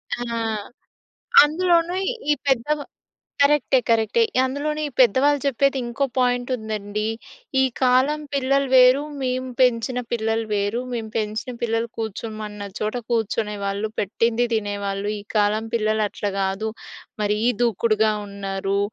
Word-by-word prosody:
ఆ! - - -12 1.3
అందులోనూ 340 +2 +2 0.4
ఈ - - +6
పెద్దవా 280 +3 +1 0.6
కరెక్టే, 280 -2 +4
కరెక్టే. 225 - +3 0.2
అందులోనూ 290 +3 -2
ఈ - - -11
పెద్దవాళ్ళు 265 +4 +4
చెప్పేది 275 0 +2
ఇంకో 240 +4 -1
పాయింట్ 245 0 +1
ఉందండి. 215 -1 -4 0.6
"ఈ - - +5 0.2
కాలం 260 +4 +3
పిల్లలు 275 0 +1
వేరు. 255 +2 +7 0.2
మేము 255 0 -1
పెంచిన 250 0 +2
పిల్లలు 225 0 0
వేరు. 205 +4 0
మేము 225 -2 -3
పెంచిన 220 +3 -2
పిల్లలు 230 0 0
కూర్చోమన్న 215 -1 -5 0.2
చోట 215 +3 -2
కూర్చునే 220 -2 0
వాళ్ళు. 200 +2 -2
పెట్టింది 230 +4 +1
తినేవాళ్ళు. 200 -2 -2
ఈ - - -11
కాలం 210 +1 +2
పిల్లలు 215 -1 +1
అట్లా 205 0 -3
గాదు. 195 +3 -1 0.5
మరీ 210 0 +1 0.2
దూకుడుగా 220 -1 +2
ఉన్నారు. 195 0 -3
230 Hz, 120 wpm, -23 LUFS, 210-260 Hz, 1.3 s, వేరు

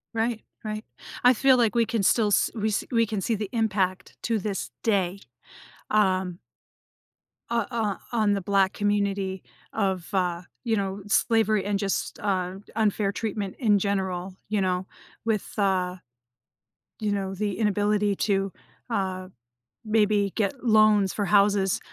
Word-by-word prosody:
Right, 225 0 0 0.2
right. 215 0 -4 0.4
I 250 - +7
feel 260 +2 +4
like 230 -2 +3
we 235 -1 +4
could 215 -5 -1
still 220 -3 +4
s 205 - +3
we 220 -1 -1
s 210 - 0
we 230 -1 +3
can 205 -2 -3
see 225 +4 0
the 205 -1 -4
impact 195 -5 -1
to 225 -2 0
this 195 -1 -3
day, 195 -3 +1 0.7
um 185 -4 +2 1.1
o 235 -2 +1
o 220 -4 -1 0.2
on 215 -3 +3
the 200 - -1
black 195 0 +2
community- 200 -2 -1 0.3
of, 190 -1 -1
uh, 180 -2 0 0.2
you 225 -2 +1
know, 195 0 -2
slavery 215 -1 +2
and 200 -1 0
just, 195 -2 -2
uh, 185 -2 -1 0.2
unfair 210 -2 +1
treatment 205 -2 -3
in 210 -5 +4
general, 190 -2 -2
you 210 -2 +1
know, 185 0 0 0.4
with, 220 -3 -2
uh, 185 -3 +1 1.0
you 210 -1 -1
know, 195 -1 -2
the 205 0 -2
inability 210 -1 +2
to, 195 -1 0 0.4
uh, 190 -4 -2 0.6
maybe 210 -2 +2
get 245 +4 -1
loans 215 -4 +4
for 205 - -1
houses, 200 -2 +3
205 Hz, 145 wpm, -26 LUFS, 190-215 Hz, 1.1 s, I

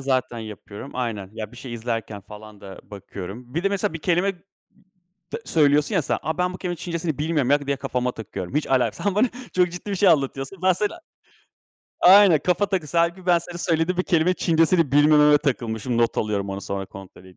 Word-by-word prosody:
zaten 130 -3 -1
yapıyorum. 110 +3 -9
Aynen, 110 -6 -4
ya, 110 -1 -7
bir 125 - -13
şey 125 -1 -8
izlerken 115 -3 -4
falan 105 +1 -13
da 95 -1 -10
bakıyorum. 100 +4 -9
Bir 170 +4 -2
de, - - +4
mesela, 200 -5 -1
bir 165 - -5
kelime 180 +4 +1 1.0
tı - - -4
söylüyorsun 150 -2 +2
ya, - - +2
sen. - - -1 0.2
Ben 180 0 0
bu - - -7
kelimenin 175 -2 -4
Çincesini 170 -4 -4
bilmiyorum 150 -4 0
ya, 145 0 +2
diye 140 0 0
kafama 125 -2 -2
takıyorum. 100 -3 -7
Hiç 150 - 0
alakas 135 +6 0
Sen 200 -2 +1
bana 225 +5 +3 0.2
çok 180 -1 +2
ciddi 180 +3 -7
bir 195 - -1
şey 195 0 +4
anlatıyorsun. 140 +2 0
Ben 185 0 +5
sana 210 - -3 1.0
Aynen, 190 -4 +7
kafa 180 +5 +1
takısı. 175 -5 -2
Hâlbuki 175 +2 0
ben 175 -1 +5
senin 175 +1 -9
söylediğin 170 +1 0
bir - - +3
kelimenin 175 +2 +2
Çincesini 165 -3 +2
bilmememe 150 0 +6
takılmışım. 120 -4 -2
Not 115 - +1
alıyorum 100 -2 -2
onu, 95 0 -5
sonra 100 -1 -4
kontrol 95 -1 -13
edeyim 95 -1 -17
145 Hz, 195 wpm, -23 LUFS, 115-175 Hz, 1.0 s, Aynen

